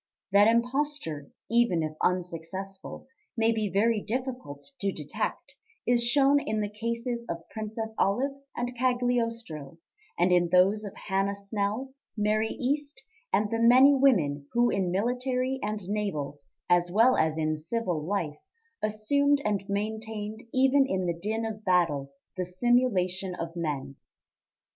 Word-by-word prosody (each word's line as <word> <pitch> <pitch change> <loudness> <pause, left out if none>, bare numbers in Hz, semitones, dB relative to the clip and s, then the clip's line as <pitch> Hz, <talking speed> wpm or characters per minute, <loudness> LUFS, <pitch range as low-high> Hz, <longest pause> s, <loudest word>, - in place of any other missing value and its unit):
That 200 +2 +6
imposture, 235 - 0 0.2
even 230 -8 +2
if 155 - -2
unsuccessful, 180 +2 -3 0.3
may 225 0 +3
be 215 -2 -1
very 210 +4 +2
difficult 245 - -4
to 200 -1 0
detect, 150 -5 -4 0.3
is 240 0 +3
shown 275 +3 +4
in 220 -5 -2
the 205 -1 -2
cases 235 +2 -3
of 170 -1 -5
Princess 220 0 -4
Olive 250 +8 +2 0.2
and 245 +1 -3
Cagliostro, 230 - -1 0.4
and 180 +2 +3
in 175 -1 +4
those 190 +4 +4
of 200 - -8
Hannah 195 0 -1
Snell, 205 +6 -3 0.2
Mary 215 +1 +1
East, 285 +1 -2 0.3
and 210 0 +1
the 230 - 0
many 255 +4 +7
women 160 - +2
who 240 0 +3
in 190 -2 0
military 250 +6 0
and 210 -3 -3
naval, 175 -9 -2 0.3
as 175 0 +3
well 230 +7 +5
as 160 0 +1
in 155 0 0
civil, 175 +1 -2
life 160 -4 -2 0.4
assumed 280 +7 +2
and 205 -2 0
maintained 215 +1 -3
even 270 +1 +4
in 190 -4 -1
the 170 - 0
din 215 +6 -2
of 215 -1 -5
battle 165 -8 +1 0.3
the 185 - 0
simulation 190 -3 +1
of 165 -1 -6
men. 140 -5 -3
210 Hz, 140 wpm, -28 LUFS, 180-240 Hz, 0.4 s, many